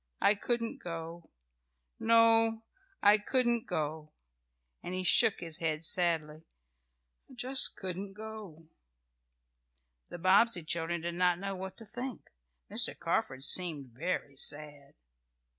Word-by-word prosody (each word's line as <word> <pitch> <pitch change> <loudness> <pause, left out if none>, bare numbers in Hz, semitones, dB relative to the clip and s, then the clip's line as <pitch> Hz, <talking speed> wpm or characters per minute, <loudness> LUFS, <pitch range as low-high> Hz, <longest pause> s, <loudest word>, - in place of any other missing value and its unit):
I 205 - +5
couldn't 230 +2 -2
go. 165 0 -7 0.7
No, 225 0 +4 0.4
I 205 +1 +7
couldn't 240 +1 +1
go," 155 -2 -3 0.7
and 180 - -5
he 185 - -2
shook 200 +3 +5
his 165 -2 -5
head 155 -1 -2
sadly. 160 -3 -1 0.9
"I - - -14
just 260 +2 0
couldn't 190 +1 -5
go." 215 -5 -9 1.5
The - - -7
Bobbsey 185 +2 +4
children 165 +1 -2
did 170 +1 -3
not 180 0 +2
know 195 +1 -4
what 190 0 -7
to 225 - -8
think. 245 +3 -7 0.4
Mr. - - +1
Carford 130 0 -1
seemed 150 -7 +3
very 145 +1 -3
sad. 145 0 -2
180 Hz, 120 wpm, -31 LUFS, 160-220 Hz, 1.5 s, I